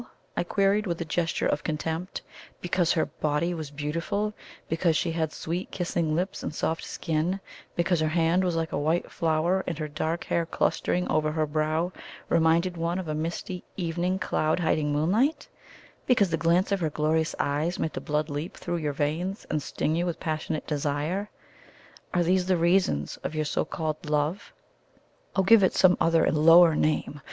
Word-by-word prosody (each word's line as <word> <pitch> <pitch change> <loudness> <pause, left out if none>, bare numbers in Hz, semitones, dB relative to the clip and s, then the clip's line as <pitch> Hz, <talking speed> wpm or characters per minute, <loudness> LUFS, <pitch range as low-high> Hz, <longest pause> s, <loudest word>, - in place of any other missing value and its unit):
I - - +1
queried, 200 +1 +1
with 170 -2 -2
a 170 - -3
gesture 165 +1 -1
of 150 - 0
contempt. 160 +4 -3 0.4
"Because 175 -1 +1
her 160 - +1
body 155 +3 -1
was 160 -4 -5
beautiful 165 +9 -2 0.3
because 165 -1 +1
she 170 - 0
had 160 -2 -1
sweet 175 +5 -4
kissing 170 -3 -1
lips 185 +3 -2
and - - -3
a - - -13
soft 160 +2 -1
skin; 165 +3 -1 0.4
because 170 0 +1
her 155 - +1
hand 165 +3 +2
was 180 -2 0
like 165 -1 -1
a - - -1
white 160 +4 0
flower, 170 +3 +1
and 165 - -2
her 155 -1 -3
dark 155 +3 -2
hair 170 -1 -1
clustering 180 +1 0
over 155 0 +1
her 155 -1 +1
brow 155 +3 0 0.4
reminded 170 +2 +3
one 170 +2 -1
of 185 -3 -4
a 155 - -2
misty 165 +3 -4
evening 175 +1 -1
cloud 160 -3 0
hiding 155 -3 +1
moonlight; 210 - +1 0.6
because 205 -8 +3
the - - +3
glance 170 +5 +2
of 200 - +2
her 160 -3 0
glorious 155 +2 0
eyes 150 +5 0
made 160 - -2
the - - -4
blood 150 0 -1
leap 150 +4 -5
through 175 -1 -3
your 150 -3 -2
veins 160 +8 -2
and 150 - 0
sting 155 +2 -1
you 175 +2 0
with 170 - -3
passionate 155 -1 -3
desire 150 +7 -2 0.8
are 175 - +2
these 180 +1 +2
the 185 -1 +3
reasons 170 - +1
of 155 - -5
your 155 0 0
so - - 0
called 155 0 -4
love? 150 +6 -1 0.8
Oh, 190 - +3
give 225 +2 +7
it 190 - +3
some 180 -1 +6
other 165 -1 +4
and 155 - +2
lower 165 +1 +8
name! 150 -1 0
165 Hz, 185 wpm, -27 LUFS, 155-180 Hz, 0.8 s, lower